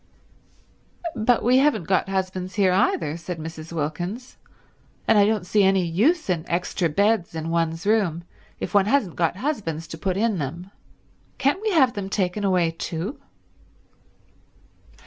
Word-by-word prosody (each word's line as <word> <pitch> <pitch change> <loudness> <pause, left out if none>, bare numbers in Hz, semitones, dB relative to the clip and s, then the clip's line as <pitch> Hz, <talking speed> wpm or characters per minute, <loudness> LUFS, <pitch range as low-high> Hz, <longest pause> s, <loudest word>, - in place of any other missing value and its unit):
"But 235 +1 +2
we 250 +2 +5
haven't 270 -9 +2
got 190 +3 +1
husbands 185 -1 -3
here 195 -3 +3
either," 165 -4 +1
said 170 +1 -6
Mrs. 160 0 -8
Wilkins, 175 - -4 0.7
"and - - +5
I 205 -1 +5
don't 215 -4 0
see 210 +3 +2
any 190 -2 +3
use 235 - +2
in 175 -4 0
extra 175 0 0
beds 200 +1 +1
in 160 +1 -3
one's 165 +1 -1
room 200 -6 +1 0.4
if 185 - -5
one 200 -1 +4
hasn't 220 - +1
got 170 0 +1
husbands 190 - -3
to 160 - -8
put 185 +2 -1
in 215 -3 +1
them. 170 +7 -5 0.7
Can't 285 +8 +1
we 435 - 0
have 265 -7 +4
them 200 -3 -5
taken 195 0 -1
away 180 -4 +2
too?" 165 - -5
185 Hz, 150 wpm, -24 LUFS, 165-215 Hz, 0.7 s, we